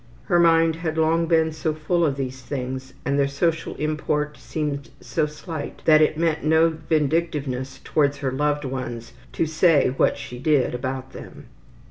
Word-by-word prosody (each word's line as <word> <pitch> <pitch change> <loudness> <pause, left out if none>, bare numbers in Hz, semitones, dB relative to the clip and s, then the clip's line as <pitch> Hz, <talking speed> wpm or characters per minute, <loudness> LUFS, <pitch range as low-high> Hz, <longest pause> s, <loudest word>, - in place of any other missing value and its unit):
Her 175 - +2
mind 165 -1 +4
had 160 -1 -3
long 165 +1 +2
been 160 -1 +3
so 155 0 -2
full 170 +3 0
of 145 -4 +1
these 130 -1 -5
things, 130 0 -5
and 140 +2 +1
their 140 - +3
social 165 +4 -1
import 150 -1 -1
seemed 145 -3 -4
so 125 +5 -1
slight, 150 0 -7
that 155 -1 +6
it 155 0 +3
meant 165 -1 0
no 160 +2 +4
vindictiveness 150 -4 -1
towards 145 -2 +1
her 140 -2 -2
loved 145 +2 0
ones 120 -3 -5 0.2
to - - +1
say 160 -2 +3
what 130 - +1
she 125 - -8
did 140 -2 +2
about 130 +1 -4
them. - - -11
150 Hz, 165 wpm, -23 LUFS, 135-160 Hz, 0.2 s, that